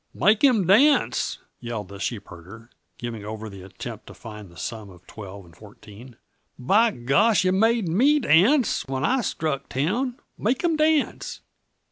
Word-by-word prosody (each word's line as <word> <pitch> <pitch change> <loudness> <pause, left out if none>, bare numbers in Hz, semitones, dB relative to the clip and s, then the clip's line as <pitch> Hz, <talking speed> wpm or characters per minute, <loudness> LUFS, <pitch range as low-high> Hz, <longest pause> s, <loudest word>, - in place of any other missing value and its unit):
"Make 215 +4 +3
'im 240 -9 +4
dance!" 275 - +3 0.2
yelled 115 -5 -6
the 100 0 -10
sheepherder, 105 +1 -7 0.3
giving 115 -3 -6
over 110 +1 -7
the 100 -1 -11
attempt 100 +4 -9
to - - -12
find 105 -4 -11
the 85 - -18
sum 110 +5 -6
of 90 -1 -17
twelve 100 -2 -10
and 85 -1 -19
fourteen. 105 +4 -14 0.4
"By 205 - +3
gosh, 190 - +2
yuh 185 - +3
made 220 +1 +2
me 255 - +3
dance 235 - +3
when 130 0 -2
I 260 0 +1
struck 155 - -3
town. 230 - -2 0.2
Make 250 +8 -1
'im 335 -2 +2
dance!" 310 -1 0
135 Hz, 155 wpm, -24 LUFS, -, 0.4 s, im